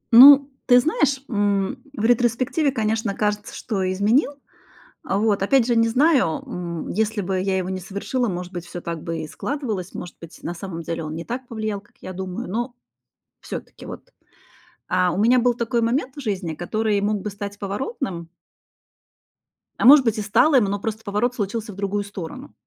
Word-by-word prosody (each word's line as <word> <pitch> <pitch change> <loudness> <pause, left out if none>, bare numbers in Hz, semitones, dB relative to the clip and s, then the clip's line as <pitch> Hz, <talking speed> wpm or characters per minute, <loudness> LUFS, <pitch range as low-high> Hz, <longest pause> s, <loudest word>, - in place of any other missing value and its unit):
Ну, 280 +2 +10 0.2
ты 250 -1 +7
знаешь, 280 -1 +1
м, 205 -4 0 0.2
в 210 - -3
ретроспективе, 245 +5 +2
конечно, 220 -3 -1
кажется, 210 0 -2
что 190 -5 -2
изменил. 215 +10 +2 0.7
А, 195 - 0
вот 205 -2 +2
опять 260 +2 +4
же 240 -1 +1
не 230 0 +4
знаю, 260 - +3
м, 170 -2 -5
если 220 +1 0
бы 190 0 -1
я 190 0 0
его 185 -1 -2
не 190 - -3
совершила, 200 +7 -2
может 180 0 -5
быть, 175 -1 -6
всё 175 - -7
так 170 -1 -5
бы 165 -1 -3
и 155 -1 -5
складывалось, 220 - -4
может 175 - -7
быть 165 -1 -12
на 170 - -3
самом 170 -1 -6
деле 165 0 -4
он 155 0 -5
не 165 +1 -5
так 250 +2 -5
повлиял, 215 -3 -3
как 205 - -29
я 185 - -7
думаю. 185 -1 -5
Но 240 +4 -2 0.7
всё-таки - - -8
вот, - - -10 0.8
а, 180 -1 +2
у - - -3
меня 240 +4 +5
был 245 0 +3
такой 235 0 -1
момент 255 +3 0
в 290 - -7
жизни, 195 - -2
который 210 +4 0
мог 205 0 0
бы 210 - -4
стать 200 0 -7
поворотным 200 - -4 1.5
а, - - +1
может 275 +1 +9
быть, 225 -2 +1
и - - -1
стал 220 +9 +3
им, 245 -5 +5
но 200 +1 -2
просто 220 +1 -4
поворот 220 +4 -1
случился 210 0 -3
в - - -13
другую 200 +1 -2
сторону. 200 - -8
210 Hz, 190 wpm, -22 LUFS, 190-245 Hz, 1.5 s, Ну